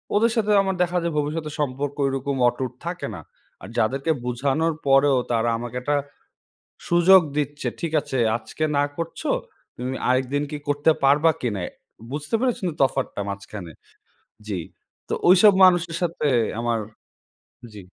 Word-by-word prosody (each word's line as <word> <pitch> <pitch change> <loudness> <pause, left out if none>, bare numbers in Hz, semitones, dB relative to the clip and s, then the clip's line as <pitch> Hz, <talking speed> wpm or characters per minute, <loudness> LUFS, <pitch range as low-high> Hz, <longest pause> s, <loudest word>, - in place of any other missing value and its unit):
ওদের 225 +2 +3
সাথে 215 -2 +1
আমার 190 -1 -1
দেখা 180 0 -1
যায় 170 -2 -1
ভবিষ্যতের 150 +1 -2
সম্পর্ক 140 0 -2
ঐরকম 135 +1 -1
অটুট 125 0 -1
থাকে 175 +1 -4
না। 80 - -8 0.4
আর 95 - -9
যাদেরকে 135 +8 +1
বুঝানোর 140 +6 0
পরেও 135 0 +5
তারা 115 0 +1
আমাকে 120 +1 -7
একটা 145 +3 0 0.9
সুযোগ 175 +2 +7 0.2
দিচ্ছে, 145 0 -2
ঠিক 165 -2 -3
আছে, 135 -1 -4 0.2
আজকে 155 +6 -5
না 145 - +4
করছ। 165 0 -5 0.6
তুমি 125 +2 -4
আরেকদিন 130 +3 +1
কি 150 - -4
করতে 145 +2 +3
পারবা 150 +4 +5
কিনা? 105 -7 -2 0.5
বুঝতে 150 +7 -5
পেরেছেন 245 -7 0
তো - - -10
তফাৎটা 135 -5 0
মাঝখানে। 100 -3 -7 0.8
জ্বি। 95 -4 -2 0.5
তো - - -1 0.2
ঐসব 195 +2 +7
মানুষের 175 -2 +4
সাথে 165 -3 -1 0.3
আমার 120 -1 0 0.9
জি। 100 - -9
145 Hz, 145 wpm, -23 LUFS, 125-165 Hz, 0.9 s, সুযোগ